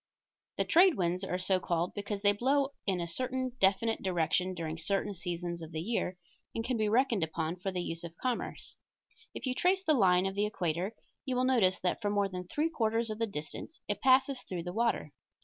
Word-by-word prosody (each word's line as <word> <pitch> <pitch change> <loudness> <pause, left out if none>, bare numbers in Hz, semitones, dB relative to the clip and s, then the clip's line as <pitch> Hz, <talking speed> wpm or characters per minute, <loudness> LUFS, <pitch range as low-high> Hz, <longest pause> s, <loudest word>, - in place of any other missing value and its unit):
The - - +1
trade 355 0 +6
winds 180 +1 0
are 180 -1 -1
so 185 0 +2
called 170 0 -1
because 205 0 -4
they 205 - +6
blow 270 +6 +2 0.2
in 190 -2 +2
a 170 - -1
certain 255 +8 -2
definite 200 +4 +3
direction 185 0 +1
during 165 -1 -4
certain 200 +4 0
seasons 175 -1 -4
of 160 0 -8
the 155 - -2
year, 185 -1 -1 0.4
and 225 - -2
can 255 - 0
be 215 -2 +1
reckoned 230 -4 +3
upon 160 +1 -2
for 190 +2 -3
the 180 -1 -2
use 165 0 -5
of 170 -1 -8
commerce. 250 -2 -3 0.6
If - - -5
you 255 - 0
trace 375 +7 +2
the 315 - +3
line 185 -7 +4
of 195 - -1
the 205 +1 +1
equator 180 +1 -2 0.3
you 260 -3 -2
will 250 - +2
notice 230 -8 +3
that 180 - 0
for 205 - 0
more 205 -1 +2
than 180 -1 -6
three 310 - 0
quarters 225 -5 0
of 215 - -5
the 230 - +1
distance 155 - -7
it 205 - -2
passes 265 0 +4
through 175 -3 -5
the 175 +1 -5
water. 230 +2 0
200 Hz, 215 wpm, -31 LUFS, 180-240 Hz, 0.6 s, trade